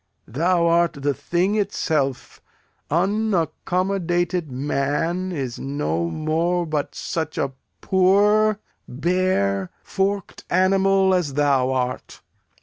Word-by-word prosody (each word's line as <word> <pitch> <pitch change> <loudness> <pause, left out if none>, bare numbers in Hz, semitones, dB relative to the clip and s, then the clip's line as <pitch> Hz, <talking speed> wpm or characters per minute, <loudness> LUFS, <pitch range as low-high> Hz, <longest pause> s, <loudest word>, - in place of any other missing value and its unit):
Thou 170 +8 +1
art 170 0 +3
the 140 -1 -1
thing 175 +8 0
itself; 160 - -1 0.5
unaccommodated 180 -2 0
man 145 +7 -1
is 135 -8 -4
no 85 - -2
more 165 - 0
but 155 -3 -3
such 160 -2 -4
a 135 - -1 0.3
poor, 205 +3 +3 0.3
bare, 130 - 0
forked 195 0 -2
animal 190 +1 +3
as 165 -7 0
thou 140 -3 +2
art. 130 -1 -3
170 Hz, 95 wpm, -22 LUFS, 140-185 Hz, 0.5 s, art